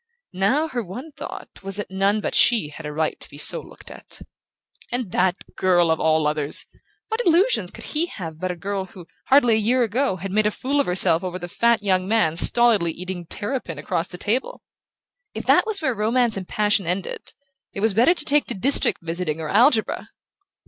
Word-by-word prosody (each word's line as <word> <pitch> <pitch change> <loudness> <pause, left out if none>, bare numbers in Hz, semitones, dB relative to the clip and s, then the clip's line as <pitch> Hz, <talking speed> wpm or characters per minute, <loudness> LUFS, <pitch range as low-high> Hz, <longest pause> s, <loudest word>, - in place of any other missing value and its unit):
Now 205 - +1
her 245 -4 -3
one 245 - -9
thought - - -10
was 195 -1 -5
that 205 -2 -6
none 200 +2 0
but - - -4
she 225 -11 +3
had 150 +1 -9
a - - -5
right 155 +1 -2
to - - -7
be - - -13
so - - +4
looked - - -15
at. - - -12 0.7
And 245 -6 -4
that 180 0 +1 0.2
girl 175 -3 +2
of 160 - 0
all 160 -1 +1
others! 150 -1 +1 0.4
What 445 +1 -1
illusions 365 +7 +2
could - - -11
he 320 +3 -2
have 165 - -8
about 185 +3 -4
a 180 - -3
girl 195 +2 -4
who, 180 -2 -14 0.2
hardly 260 -4 +4
a - - +3
year 245 +4 +1
ago, 235 0 -1
had 190 +1 -7
made 210 +1 +2
a - - +2
fool 270 +6 -2
of 280 - 0
herself 180 -2 +2
over 185 -1 -4
the 175 - -7
fat 235 +4 +1
young 185 -2 0
man 210 -7 +1
stolidly 215 -3 +6
eating 180 -1 -7
terrapin 205 - -4
across 170 +3 -2
the 180 - -9
table? 225 +8 -3 0.7
If - - -6
that - - +3
was 410 -6 0
where 260 - +1
romance 230 +2 +1
and 190 -2 -4
passion 205 -3 +1
ended, 180 +2 -4 0.4
it 200 - -6
was 220 -1 +2
better 245 - +4
to 300 - +2
take 295 -1 +3
to - - -4
district 260 -2 +2
visiting 165 -1 -3
or 155 -1 -5
algebra! 230 +1 +2
200 Hz, 205 wpm, -22 LUFS, 175-240 Hz, 0.7 s, stolidly